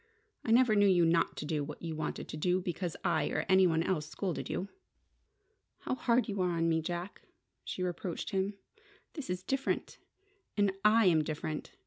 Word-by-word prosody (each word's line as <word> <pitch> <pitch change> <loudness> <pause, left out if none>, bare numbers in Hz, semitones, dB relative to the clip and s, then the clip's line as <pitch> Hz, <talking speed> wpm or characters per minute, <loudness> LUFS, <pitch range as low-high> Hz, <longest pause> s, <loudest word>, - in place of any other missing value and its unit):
"I - - -4
never 240 0 +5
knew 205 -1 +5
you 180 -3 +5
not 165 0 +2
to - - -4
do 150 -1 -1
what 150 +3 -8
you 165 -2 -3
wanted 155 0 -4
to - - -5
do 180 +4 +1
because 175 -1 -3
I - - +2
or - - -1
any 190 -1 +6
one 165 -1 +2
else 155 -5 -1
scolded 185 -4 -3
you!" 190 - -2 1.1
"How - - -2
hard 250 -1 +2
you 200 -3 -2
are 175 -2 +1
to 165 - +1
me, 165 -1 +2
Jack!" 175 +3 -5 0.4
she 185 - -4
reproached 180 -1 -3
him. 195 +1 0 0.6
"This 295 - -7
is 180 0 -2
different. 270 +6 -2 0.6
And 205 -1 +3
I 215 +1 +5
am 160 -4 +4
different. 155 0 -4
180 Hz, 185 wpm, -32 LUFS, 165-200 Hz, 1.1 s, any